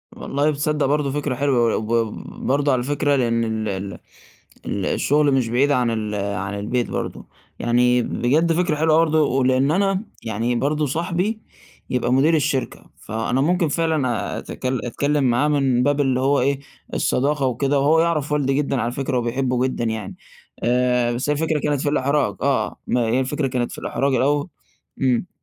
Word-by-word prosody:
والله 145 +2 0
تصدَّق 150 0 0
برضه 145 0 +1
فكرة 145 -2 -2
حلوة 135 -1 +1
وي 115 - +1
وب 110 0 0 0.3
برضه 140 +2 +2
على 130 - +2
الفكرة 145 +2 0
لأن 115 -3 +1
ال 110 -1 -2
ال 95 -2 -5 0.7
ال 100 -2 -2
الشغل 145 0 +2
مش 125 -4 +1
بعيد 135 +5 +2
عن 125 -4 +2
ال 105 -2 -3
عن 100 0 -3
البيت 120 +4 -1
برضه، - - -4 0.3
يعني 125 +1 +3
بجد 155 +10 +1
فكرة 170 -2 +1
حلوة 155 +1 +3
برضه، 160 -1 +3
ولإن 130 +1 +2
أنا 195 +3 +1 0.2
يعني 115 +2 -1
برضه 150 +4 0
صاحبي 175 - -2 0.5
يبقى 125 -1 0
مدير 140 +5 +4
الشركة، 140 -3 -1
فأنا 115 +4 -2
ممكن 175 +3 +2
فعلًا 150 -8 -1
أتك - - -9
أتكلّم 135 +3 0
معاه 125 +3 +2
من 135 -4 +2
باب 145 +1 +2
اللي 130 -2 +1
هو 140 +2 +2
إيه، 140 +1 +1 0.3
الصداقة 140 +1 +1
وكده، 135 +3 +1
وهو 155 +4 +4
يعرف 155 -4 0
والدي 140 -2 +1
جدًا 140 -2 0
على 115 +2 -1
فكرة 135 0 -2
وبيحبُّه 125 +1 0
جدًا 130 - -3
يعني، 110 -4 -4 0.5
آآ 125 0 +2
بس 125 +4 -2
هي - - +3
الفكرة 155 +1 0
كانت 145 -2 -1
في 145 - 0
الإحراج، 145 0 +1
آه، 140 -1 0
ما 125 - +1
هي 120 +3 +2
الفكرة 135 +2 -1
كانت 125 -2 -2
في - - -8
الأحراج 140 -1 0
الأوّ 145 +5 +1 0.5
امم. 130 +4 +1
135 Hz, 170 wpm, -21 LUFS, 120-150 Hz, 0.7 s, مدير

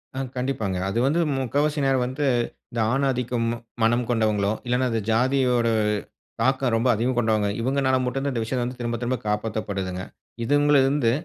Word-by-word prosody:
ஆ. - - -3 0.2
கண்டிப்பாங்க. 125 -7 -1
அது 115 - -1
வந்து 155 +5 +2 0.2
3/4வாசி 145 +4 0
நேரம் 135 -2 +2
வந்து, 130 +3 -2 0.5
இந்த 120 - -3
ஆண் 135 +2 +1
ஆதிக்கம் 125 -2 -1 0.4
மனம் 120 +2 +2
கொண்டவங்களோ! 110 -4 +1
இல்லன்னா 125 +1 +1
அது 115 - 0
ஜாதியோட 125 0 +2 0.7
தாக்கம் 130 0 +2
ரொம்ப 115 +3 +1
அதிகம் 120 +3 -1
கொண்டவங்க. 110 -3 +2
இவங்கனால 130 +1 +1
மட்டும் 130 +2 -2
தான் 140 - -1
இந்த 115 - -1
விஷயத்த 125 +2 -1
வந்து 125 +1 -5
திரும்ப, 120 -1 -2
திரும்ப 125 +1 0
காப்பாத்தப்படுதுங்க. 105 -3 -2 0.4
இவங்களிருந்து 145 -2 +3
125 Hz, 155 wpm, -24 LUFS, 115-135 Hz, 0.7 s, இவங்களிருந்து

